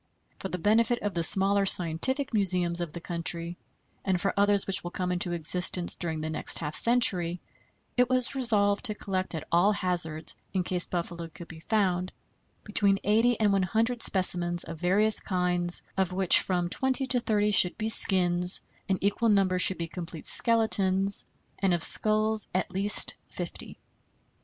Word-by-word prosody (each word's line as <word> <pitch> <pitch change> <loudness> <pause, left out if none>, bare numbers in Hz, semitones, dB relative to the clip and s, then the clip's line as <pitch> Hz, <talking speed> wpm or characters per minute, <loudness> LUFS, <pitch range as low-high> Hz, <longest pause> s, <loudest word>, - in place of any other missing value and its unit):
For - - -5
the 180 - -4
benefit 225 +6 +1
of 205 -1 -3
the 170 - -2
smaller 195 +4 +1
scientific 190 - 0
museums 180 -4 0
of 170 -3 -5
the 170 - -8
country, 170 0 -2 0.4
and 190 -2 -1
for 195 +2 -1
others 200 0 +2
which 195 - -3
will 175 - -5
come 180 0 -4
into 175 0 +1
existence 175 +2 +1
during 160 -3 -4
the 155 - -4
next 155 - -2
half 150 -2 -5
century, 180 -8 +3 0.6
it 250 0 +2
was 255 -1 0
resolved 210 -5 0
to 215 -3 0
collect 185 -4 -4
at 155 -1 -7
all 180 +5 +3
hazards, 170 -5 -2 0.2
in 185 -2 -1
case 180 0 -1
buffalo 170 -1 -5
could 165 +1 -13
be 165 - -11
found, 185 -1 -1 0.5
between 200 -2 0
eighty 225 +3 +1
and 210 -2 +2
one 195 - +1
hundred 225 +6 -1
specimens 175 -3 0
of 165 -1 -9
various 205 +5 +2
kinds, 180 -2 -2
of 190 -2 -1
which 185 -1 +4
from 180 -2 -2
twenty 265 +7 0
to 255 -1 +1
thirty 210 -3 0
should 180 -3 +4
be 220 - -3
skins, 180 -4 +5 0.3
an 190 - +1
equal 205 +3 0
number 195 -3 +1
should 185 0 +3
be 170 - -4
complete 170 -2 -9
skeletons, 200 -4 +1 0.3
and 190 -2 +1
of 170 - -3
skulls 215 0 +2
at 185 - -2
least 200 +2 +3
fifty. - - -7
185 Hz, 170 wpm, -27 LUFS, 175-210 Hz, 0.6 s, skins